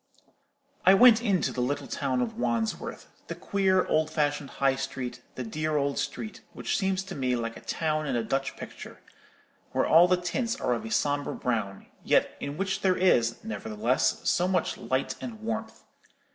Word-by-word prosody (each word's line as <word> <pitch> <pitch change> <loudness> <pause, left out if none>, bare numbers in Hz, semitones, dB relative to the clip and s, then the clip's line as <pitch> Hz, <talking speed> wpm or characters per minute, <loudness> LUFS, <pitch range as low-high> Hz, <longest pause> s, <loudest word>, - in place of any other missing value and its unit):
"I 190 +2 +7
went 235 +1 +7
into 200 -8 +1
the 125 - -2
little 140 +4 -1
town 130 -3 -1
of 115 - -4
Wandsworth, 115 -2 -2 0.2
the - - -5
queer 190 -2 +1
old 155 0 +1
fashioned 145 -2 -1
High 135 -1 +3
Street, 135 -2 -5
the 130 - -4
dear 155 +6 -1
old 140 -1 0
street, 220 - -4
which - - -2
seems 190 -1 0
to 190 0 -8
me 130 -2 0
like 115 -1 -3
a - - -9
town 155 -1 -1
in 130 - -1
a 120 - 0
Dutch 135 +4 -2
picture, - - -9 0.7
where - - +2
all 170 +3 +7
the 185 0 +3
tints 230 +8 -2
are 125 - +1
of 115 - -3
a - - -5
sombre 145 +4 0
brown, 105 -6 -2 0.2
yet - - +2
in 140 +1 -5
which 195 +1 -1
there 185 -1 +2
is, 120 -11 +2
nevertheless, 110 +3 -1
so 180 - +3
much 185 -1 0
light 130 +1 -1
and 230 -3 -6
warmth. 225 0 -4
145 Hz, 180 wpm, -28 LUFS, 125-190 Hz, 0.7 s, I